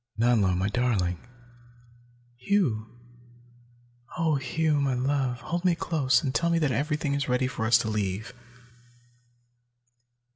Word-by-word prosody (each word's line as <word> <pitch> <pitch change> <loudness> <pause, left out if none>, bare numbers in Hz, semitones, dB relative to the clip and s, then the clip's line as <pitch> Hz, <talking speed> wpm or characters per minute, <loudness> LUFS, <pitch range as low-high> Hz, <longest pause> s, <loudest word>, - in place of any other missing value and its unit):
Nanlo, 110 -6 +3
my 95 +2 0
darling!" 100 -6 0 1.2
"Hugh! 125 - 0 1.3
Oh, 160 -3 +1
Hugh, 150 +3 0
my 135 -2 0
love, 130 -1 -1
hold 175 +2 -3
me 180 -2 +3
close 140 -7 +1
and 130 - -2
tell 170 +2 +1
me 170 - +2
that 150 -5 +1
everything 145 +3 -1
is 140 -1 -2
ready 125 +1 +1
for 115 -3 -2
us 120 +1 +6
to 115 - -2
leave!" 105 +1 -3
130 Hz, 125 wpm, -27 LUFS, 110-150 Hz, 1.3 s, us